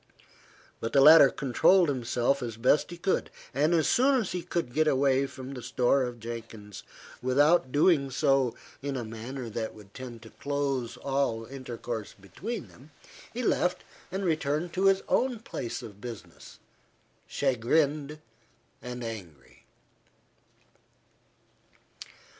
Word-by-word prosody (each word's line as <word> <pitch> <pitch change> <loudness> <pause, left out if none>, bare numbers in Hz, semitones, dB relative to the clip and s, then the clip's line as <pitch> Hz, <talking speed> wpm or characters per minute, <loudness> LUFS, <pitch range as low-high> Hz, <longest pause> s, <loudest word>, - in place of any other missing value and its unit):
But 115 - -4
the 140 - +5
latter 150 0 +9
controlled 160 +8 +3
himself 130 0 0
as 115 -3 -5
best 130 +5 +3
he 175 - -8
could; 190 +2 0 0.2
and 145 +5 +2
as 160 - +2
soon 265 +1 +4
as 215 - -3
he 180 - -2
could 170 -7 -3
get 155 +2 +2
away 135 -1 +3
from 130 0 -9
the 125 - -7
store 125 +3 +2
of 120 -1 -7
Jenkins, 115 -3 -8 0.4
without 140 +3 +3
doing 145 -1 +3
so 135 -2 +2 0.3
in 140 -1 -3
a 120 - -3
manner 115 +3 -6
that 110 0 -4
would 100 -2 -15
tend 120 -3 -9
to 110 - -13
close 140 -4 -2
all 135 -5 -1
intercourse 120 -4 -6
between 205 - -6
them, 135 +5 -17 0.4
he 245 +2 -4
left 180 -5 +1 0.3
and 190 +1 -2
returned 155 0 -1
to 190 +1 0
his 195 0 +3
own 255 -2 +1
place 130 - -5
of 105 -3 -11
business, 115 -3 -10 0.7
chagrined 145 +3 0 0.6
and 125 0 -6
angry. 95 -12 -9
135 Hz, 135 wpm, -28 LUFS, 120-155 Hz, 0.7 s, latter